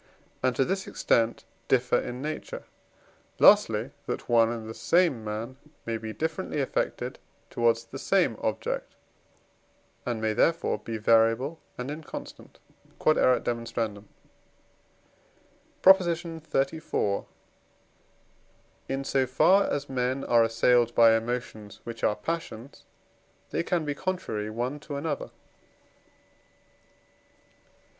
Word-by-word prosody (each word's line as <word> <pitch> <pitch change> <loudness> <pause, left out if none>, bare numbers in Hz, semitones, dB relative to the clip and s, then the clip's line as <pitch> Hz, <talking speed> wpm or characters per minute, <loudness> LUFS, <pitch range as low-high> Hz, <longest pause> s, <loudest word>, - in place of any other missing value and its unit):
and 130 -1 +1
to 135 - +2
this 190 +4 -2
extent 115 0 +1 0.2
differ 125 -1 +3
in 125 +2 -5
nature; 155 +1 -5 0.7
lastly, - - +5 0.2
that - - -4
one 115 -1 +4
and 115 -2 -5
the 110 - -6
same 165 -5 +2
man 110 +4 -5 0.3
may 115 - -2
be 110 -1 -5
differently 160 +4 -3
affected 135 - -2 0.3
towards 115 -1 +2
the 115 - -9
same - - +2
object, - - -3 1.1
and 120 -2 -2
may 110 0 0
therefore 165 +9 +1
be 115 -1 -5
variable 115 +7 +3 0.2
and 125 +3 -4
inconstant. 155 0 -9 0.4
Q.E.D. 155 - +3
PROP. 115 -3 0 2.1
XXXIV. 160 - -2 1.6
In 135 0 -2
so 135 -1 +1
far 190 +10 +5
as 145 0 -2
men 130 +1 -1
are 120 -1 +4
assailed 120 +1 +3
by 115 -1 +7
emotions 115 -3 -4
which 115 -1 -8
are 105 - +3
passions, 135 -1 -6 0.7
they - - 0
can 170 -2 -1
be 145 - -1
contrary 145 - -3
one 120 +6 -3
to 145 0 -7
another. 145 0 -3
125 Hz, 110 wpm, -27 LUFS, 115-150 Hz, 2.1 s, by